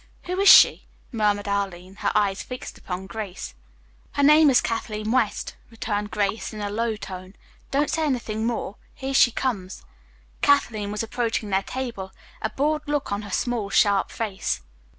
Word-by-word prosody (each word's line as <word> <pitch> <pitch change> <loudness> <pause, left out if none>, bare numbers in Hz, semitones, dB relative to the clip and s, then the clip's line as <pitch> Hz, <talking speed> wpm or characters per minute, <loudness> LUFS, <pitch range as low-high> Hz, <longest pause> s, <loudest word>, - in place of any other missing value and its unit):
"Who 365 +1 -3
is 395 - +6
she?" - - +8 0.2
murmured 210 -3 +1
Arline, 195 -2 -3
her - - 0
eyes 200 -2 +2
fixed 250 0 -8
upon 180 +1 -5
Grace. 195 - -6 0.6
"Her 285 - +1
name 300 +1 +7
is 255 - +5
Kathleen 215 -1 -3
West," 230 -4 0
returned 210 -2 -3
Grace 210 +1 -1
in 215 - -8
a 205 -1 -3
low 225 +1 -1
tone. 185 -2 -9 0.3
"Don't 290 +2 +1
say 320 - 0
anything 225 -4 -1
more. 230 -4 -3 0.2
Here 270 0 -4
she 260 - +6
comes." 205 -7 -3 0.6
Kathleen 225 -8 +2
was 210 +1 -2
approaching 225 -2 -2
their 190 0 +3
table, 215 -5 -5 0.3
a 220 - -1
bored 300 +4 0
look 290 -5 -1
on 200 +1 -1
her 205 - -9
small, 225 0 -1
sharp 200 0 +3
face. 210 -4 -3
215 Hz, 165 wpm, -24 LUFS, 200-250 Hz, 0.6 s, she